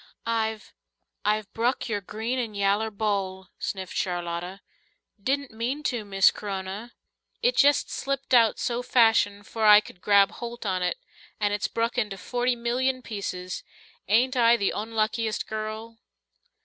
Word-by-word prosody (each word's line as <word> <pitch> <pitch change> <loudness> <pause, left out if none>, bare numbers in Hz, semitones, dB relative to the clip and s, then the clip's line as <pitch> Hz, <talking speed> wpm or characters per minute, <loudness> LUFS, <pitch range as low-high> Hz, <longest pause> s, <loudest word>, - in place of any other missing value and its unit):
"I've 220 -1 -2 0.5
I've 210 -1 0
bruk 240 +4 0
your 210 -3 -2
green 220 +6 -3
and 220 -4 -3
yaller 200 +2 +2
bowl," 195 -3 -2
sniffed 190 -2 -4
Charlotta. 175 +1 -3 0.6
"Didn't 275 +4 -1
mean 245 +7 -3
to, 240 -6 -1
Miss 195 -1 +4
C'rona. 200 +3 -6 0.5
It - - +3
jest 285 0 +4
slipped 275 -1 -3
out 230 -3 +5
so 240 0 -1
fashion 225 -5 +3
'fore 220 +1 0
I 210 0 +10
c'd 180 -4 -12
grab 200 -1 +5
holt 235 -1 -7
on 185 -2 0
it. 180 -1 0 0.4
And 205 -1 +1
it's 205 - 0
bruk 230 +2 -1
into 210 -4 -2
forty 245 +6 0
millyun 255 +2 -1
pieces. 185 -4 -5 0.5
Ain't 245 +6 +3
I 235 -1 +5
the 200 - 0
onluckiest 220 +1 -1
girl?" 220 +1 -6
220 Hz, 145 wpm, -26 LUFS, 200-240 Hz, 0.6 s, I